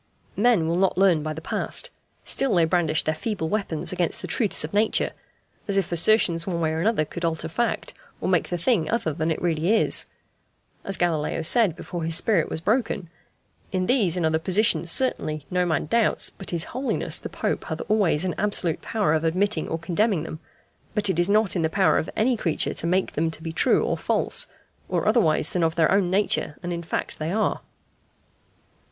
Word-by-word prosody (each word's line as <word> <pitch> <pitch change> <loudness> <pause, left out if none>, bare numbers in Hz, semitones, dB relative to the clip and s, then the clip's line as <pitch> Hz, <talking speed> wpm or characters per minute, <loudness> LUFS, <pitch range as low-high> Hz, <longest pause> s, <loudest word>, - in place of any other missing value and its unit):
Men 210 -7 +3
will 170 +1 0
not 190 -1 +1
learn 185 -5 +4
by 155 +1 -4
the 155 +1 -6
past; - - 0 0.3
still 270 -7 +1
they 170 -2 +4
brandish 160 -2 +2
their 155 - 0
feeble 160 -1 -3
weapons 190 -6 0
against 175 -2 -1
the - - -4
truths 215 -5 +1
of 155 - -6
Nature, 215 +2 +2 0.6
as 200 -1 0
if 190 -3 0
assertions 170 -1 +3
one 175 -3 -2
way 160 -1 0
or 160 - -2
another 205 -5 +1
could 170 +3 -8
alter 165 -1 -1
fact, 235 +9 -2 0.3
or - - -3
make - - +1
the 175 - -2
thing 170 -3 +1
other 225 -9 -1
than 160 +1 -2
it 160 - -1
really 170 +1 0
is. - - +2 0.8
As 195 - +2
Galileo 165 -2 -1
said 205 -1 +4
before 175 -1 -6
his 165 0 +1
spirit 180 -2 +2
was 160 - -4
broken, 205 -4 -1 0.6
"In 185 -1 -1
these 200 -7 +2
and 175 - 0
other 160 0 +1
positions 185 0 +1
certainly 155 - 0
no 180 0 +1
man 160 -4 0
doubts 230 +8 +2
but 195 - -8
His 170 -2 +1
Holiness 260 +2 0
the - - -7
Pope - - -3
hath - - -5
always 195 -6 +2
an 180 - -1
absolute 195 -5 +1
power 210 -9 0
of 160 0 0
admitting 180 +1 0
or 165 - -2
condemning 180 +1 0
them; 160 -1 -7 0.6
but 205 -2 +1
it 175 - -2
is 175 +2 +2
not 210 -2 +2
in 175 - 0
the 160 - +1
power 190 +2 +3
of 160 - -4
any 245 +3 +2
creature 170 -7 0
to 170 - -2
make 185 +2 +1
them 160 +2 0
to 160 0 -5
be 165 -1 -5
true - - +2
or - - -1
false, - - 0 0.4
or - - -1
otherwise 165 -9 +2
than 180 - 0
of 165 -1 +1
their 160 -2 +3
own 195 -2 +2
nature 190 -5 0
and 175 0 -3
in 170 - -4
fact 165 - -4
they 155 +2 -2
are." 215 +2 0
175 Hz, 205 wpm, -24 LUFS, 160-205 Hz, 0.8 s, learn